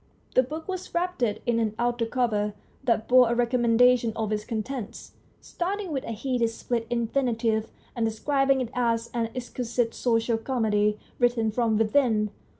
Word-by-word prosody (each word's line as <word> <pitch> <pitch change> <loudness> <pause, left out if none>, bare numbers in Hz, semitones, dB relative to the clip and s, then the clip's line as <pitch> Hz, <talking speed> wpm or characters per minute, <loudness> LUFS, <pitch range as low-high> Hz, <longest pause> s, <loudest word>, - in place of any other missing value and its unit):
The - - +6
book 305 +5 -6
was 370 -2 -5
wrapped 360 -2 -1
in 230 +1 0
an 220 -2 -1
outer 240 -1 0
cover 210 -4 0 0.3
that 225 -2 +1
bore 250 -2 +6
a - - +1
recommendation 240 -1 +3
of 220 -1 -2
its 210 0 -1
contents, 230 0 -5 0.3
starting 380 +1 -3
with 270 -3 -2
a - - -4
hideous 230 0 -1
split 230 -2 -2
infinitive 230 -2 0 0.3
and 235 - -1
describing 270 +4 +1
it 245 - -3
as 235 -1 0
an 230 -2 -1
exquisite 240 -1 -2
social 230 -1 +1
comedy 210 -4 +1 0.2
written 240 -3 +2
from 225 -1 +1
within. 220 -2 +2
235 Hz, 150 wpm, -26 LUFS, 225-255 Hz, 0.3 s, The